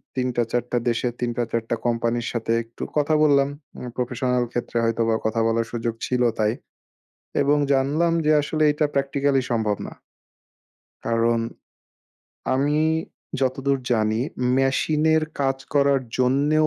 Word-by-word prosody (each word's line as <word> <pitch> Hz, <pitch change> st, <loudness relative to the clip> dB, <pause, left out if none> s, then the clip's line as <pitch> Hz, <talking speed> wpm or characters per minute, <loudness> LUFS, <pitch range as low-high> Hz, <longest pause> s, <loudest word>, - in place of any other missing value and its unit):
৩ 130 Hz, -1 st, 0 dB
টা, 120 Hz, -, +2 dB
৪ 120 Hz, -1 st, +1 dB
টা 125 Hz, -, +2 dB
দেশের 120 Hz, +1 st, -1 dB
৩ 120 Hz, -, 0 dB
টা, 120 Hz, -, +2 dB
৪ 115 Hz, -1 st, 0 dB
টা -, -, +1 dB
কোম্পানির 120 Hz, 0 st, 0 dB
সাথে 115 Hz, -1 st, -2 dB
একটু 115 Hz, +1 st, -9 dB
কথা 150 Hz, +1 st, +2 dB
বললাম। 140 Hz, -2 st, +4 dB, 0.3 s
উম 125 Hz, -, -6 dB
প্রফেশনাল 125 Hz, 0 st, 0 dB
ক্ষেত্রে 120 Hz, -1 st, -3 dB
হয়তোবা 115 Hz, 0 st, +1 dB
কথা 110 Hz, +1 st, 0 dB
বলার 115 Hz, 0 st, +1 dB
সুযোগ 115 Hz, -1 st, -2 dB
ছিল 125 Hz, -1 st, 0 dB, 0.2 s
তাই। 105 Hz, 0 st, +3 dB, 0.9 s
এবং 145 Hz, +1 st, +3 dB
জানলাম 145 Hz, +5 st, +2 dB
যে 155 Hz, -, +4 dB
আসলে 155 Hz, +1 st, -1 dB
এটা 150 Hz, +1 st, +1 dB
প্র্যাকটিক্যালি 140 Hz, 0 st, +1 dB
সম্ভব 110 Hz, -3 st, +1 dB
না। -, -, -9 dB, 1.1 s
কারণ 115 Hz, 0 st, +2 dB, 1.2 s
আমি 145 Hz, +3 st, +1 dB, 0.6 s
যতদূর 135 Hz, +1 st, +1 dB
জানি 110 Hz, -1 st, +1 dB, 0.4 s
মেশিন 135 Hz, +3 st, +1 dB
এর 160 Hz, -, +3 dB, 0.2 s
কাজ 135 Hz, -1 st, +1 dB, 0.2 s
করার 140 Hz, -1 st, +4 dB, 0.2 s
জন্যেও 145 Hz, +5 st, +3 dB
125 Hz, 145 wpm, -23 LUFS, 115-140 Hz, 1.2 s, বললাম